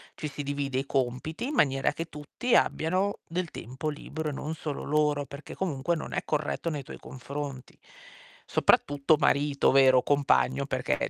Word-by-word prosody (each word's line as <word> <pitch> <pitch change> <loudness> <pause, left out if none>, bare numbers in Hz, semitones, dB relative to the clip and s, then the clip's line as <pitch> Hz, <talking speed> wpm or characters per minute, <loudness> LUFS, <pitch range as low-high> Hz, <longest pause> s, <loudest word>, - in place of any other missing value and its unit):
ci 150 - -4
si 145 - -6
divide 140 -2 -1
i 135 - -3
compiti 135 - -2
in 300 - -3
maniera 135 - +3
che 165 - -4
tutti 155 - -2
abbiano 185 +5 +2
del 175 0 -3
tempo 130 +6 -5
libero, 150 +1 -4
e - - -3
non 155 +3 -4
solo 150 -2 -5
loro. 150 -1 +1
Perché 140 +1 -9
comunque 170 -2 -1
non 155 - -6
è - - -1
corretto 150 +2 -1
nei 150 -3 -4
tuoi - - -9
confronti. 135 0 -7 0.7
Soprattutto 145 +2 +3
marito, 140 -1 +3
vero, 130 -2 +6
compagno, 140 -1 +2
perché 130 -2 -1
145 Hz, 160 wpm, -28 LUFS, 135-155 Hz, 0.7 s, vero